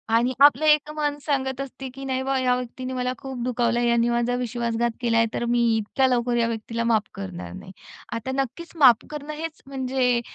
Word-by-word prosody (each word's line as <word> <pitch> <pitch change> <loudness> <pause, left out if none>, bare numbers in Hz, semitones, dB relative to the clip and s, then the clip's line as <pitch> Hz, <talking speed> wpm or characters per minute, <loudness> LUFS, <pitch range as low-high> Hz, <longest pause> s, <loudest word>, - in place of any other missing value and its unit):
आणि 245 +3 +2
आपलं 285 +1 +6
एक 300 0 +4
मन 295 -1 -1
सांगत 265 -2 -1
असते, 270 -1 -7
की 270 +1 -8
"नाही 260 -1 -1
बुवा, 270 0 0
या 250 -1 +2
व्यक्तीनी 255 +1 -5
मला 250 0 -1
खूप 265 -2 -6
दुखावलं, 240 -1 +1
यानी 235 0 +2
माझा 240 +1 +1
विश्वासघात 235 -1 -1
केलाय, 230 -1 +3
तर 240 - -2
मी 240 0 +2 0.2
इतक्या 240 +5 +1
लवकर 245 -1 +1
या 230 -1 +2
व्यक्तीला 230 0 -3
माफ 215 -1 +1
करणार 90 -2 -7
नाही." 185 - -10 0.4
आता 230 +3 -3
नक्कीच, 270 +6 -6
माफ 255 -7 +6
करणं 300 0 -6
हेच 320 +1 -6
म्हणजे 260 -2 0
250 Hz, 190 wpm, -24 LUFS, 235-270 Hz, 0.4 s, आपलं